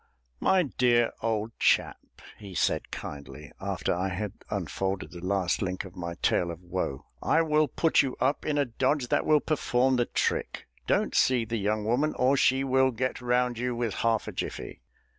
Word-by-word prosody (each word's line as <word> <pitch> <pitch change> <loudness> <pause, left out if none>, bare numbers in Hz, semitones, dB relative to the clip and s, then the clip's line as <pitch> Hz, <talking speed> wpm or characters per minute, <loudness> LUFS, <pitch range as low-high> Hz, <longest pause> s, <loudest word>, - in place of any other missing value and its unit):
"My 190 -1 +3
dear 120 -5 +2
old 110 0 -1
chap," - - +2 0.4
he 100 -3 -10
said - - 0
kindly, 70 -1 -8
after - - -1
I 90 +2 -1
had 95 +2 -4 0.2
unfolded 95 0 -3
the 85 -1 -10
last 95 -2 0
link 95 0 -2
of 95 0 -12
my 85 -2 -5
tale 85 - +2
of 85 -1 -6
woe, 90 -6 -4 0.2
"I 165 - +3
will 155 -1 +2
put 165 +4 +3
you 135 -3 -3
up 135 +3 +1
in 150 -1 -1
a 145 - +3
dodge 130 +2 0
that - - +1
will 150 -1 +5
perform 130 -4 +1
the 120 - +1
trick. - - -1 0.2
Don't - - +1
see 125 -3 +3
the 115 +1 -2
young 105 +1 -1
woman, 130 +7 +1
or 130 +2 +3
she 135 0 +3
will 130 0 +3
get 130 +1 -2
round 125 -1 +1
you 125 0 -1
with 115 -3 -1
half 115 -2 +1
a - - -3
jiffy. - - -6
120 Hz, 185 wpm, -28 LUFS, 95-130 Hz, 0.4 s, will